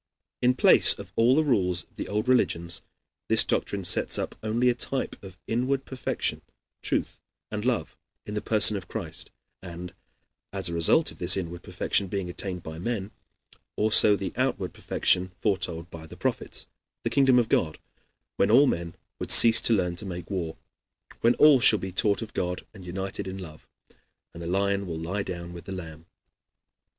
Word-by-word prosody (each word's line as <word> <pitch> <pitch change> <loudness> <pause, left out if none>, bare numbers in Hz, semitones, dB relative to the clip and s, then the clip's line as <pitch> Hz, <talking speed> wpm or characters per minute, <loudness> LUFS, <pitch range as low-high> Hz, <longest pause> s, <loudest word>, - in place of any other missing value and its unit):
In 125 +1 +3
place - - +6
of - - -11
all 120 +3 +4
the 155 - +3
rules 90 - 0
of - - -34
the - - -6
old 105 +3 -2
religions, 85 -9 +1 0.5
this - - +5
doctrine 100 -1 -2
sets 85 - +2
up - - -4
only 115 +3 0
a - - +2
type 130 +2 -2
of 95 -2 -12
inward 130 +4 -1
perfection, 130 -1 -3 0.4
truth, - - -3 0.3
and 105 -1 -4
love 125 -2 -2 0.3
in 105 - -7
the 105 - -3
person 105 -1 +4
of 95 -2 -6
Christ, - - -6 0.3
and 90 0 -9 0.6
as 95 -2 -3
a 85 - -3
result 85 - +3
of - - -16
this 90 +2 +4
inward 85 -2 -5
perfection 95 +2 -1
being 95 -2 -4
attained 90 -1 -5
by 80 0 -8
men 105 0 -4 0.6
also 105 -1 +5
the 95 -1 -5
outward 125 -7 -2
perfection 90 0 0
foretold 90 -5 -2
by 80 -1 -10
the - - -13
Prophets - - -3 0.4
the - - -2
kingdom 135 -2 +4
of 120 -2 +2
God, 80 -7 0 0.6
when 100 - +2
all 130 +6 +6
men 85 -9 -2 0.2
will - - -5
cease 115 -1 +9
to 115 - +3
learn 90 -4 0
to 105 - -4
make 90 -1 -7
war, 85 -4 -4 0.6
when 115 +1 +3
all 150 -3 +6
shall 110 -2 +5
be 95 -2 -6
taught 100 +4 0
of 110 - -11
God 90 0 -3
and 95 -4 -12
united 95 +2 -5
in 95 0 -6
love, 80 -5 -11 0.7
and 85 - -10
the 85 - -6
lion 100 +2 -1
will 80 -2 -5
lie 90 +6 -3
down 85 -2 -7
with 85 - -11
the - - -8
lamb. 80 -2 -10
95 Hz, 180 wpm, -26 LUFS, 90-115 Hz, 0.7 s, cease